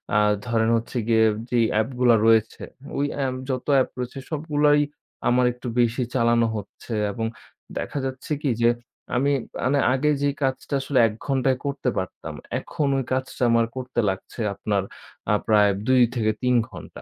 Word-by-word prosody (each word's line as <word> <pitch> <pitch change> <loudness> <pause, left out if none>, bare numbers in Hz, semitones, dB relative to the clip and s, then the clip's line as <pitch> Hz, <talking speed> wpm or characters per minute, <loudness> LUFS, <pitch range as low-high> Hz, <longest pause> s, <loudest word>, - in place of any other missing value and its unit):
আ - - +5 0.3
ধরেন 115 -1 +1
হচ্ছে 115 +2 -5
গিয়ে 110 -1 +4 0.2
যেই 120 -2 +3
অ্যাপগুলা 120 +2 +3
রয়েছে 110 -1 +3 0.3
ওই 140 - +1 0.2
এম 130 - -1 0.2
যত 130 -1 -2
অ্যাপ 130 - +3
রয়েছে 125 +2 -4
সবগুলোই 150 -1 +2 0.5
আমার 125 0 +4
একটু 125 0 -9
বেশি 120 +2 +2
চালানো 115 -1 +3
হচ্ছে 105 +3 -8 0.2
এবং 115 0 -3 0.5
দেখা - - -4
যাচ্ছে 130 +3 -6
কি 140 - 0
যে 120 - +5 0.5
আমি 140 +3 +2 0.3
মানে 140 +2 +2
আগে 145 +3 +1
যে 145 - +2
কাজটা 135 +2 -2
আসলে 135 -1 +1
১ 105 - -5
ঘন্টায় 135 -2 +1
করতে 140 -2 -1
পারতাম, 95 - -5 0.3
এখন 145 - -2
ওই 135 - 0
কাজটা 130 0 -2
আমার 115 0 +4
করতে 130 -1 -3
লাগছে 95 +5 -6
আপনার 100 -1 -1 0.5
আ - - +4
প্রায় 105 -2 +5 0.2
২-৩ 125 -1 +2
ঘণ্টা। - - -11
125 Hz, 155 wpm, -24 LUFS, 115-135 Hz, 0.5 s, আ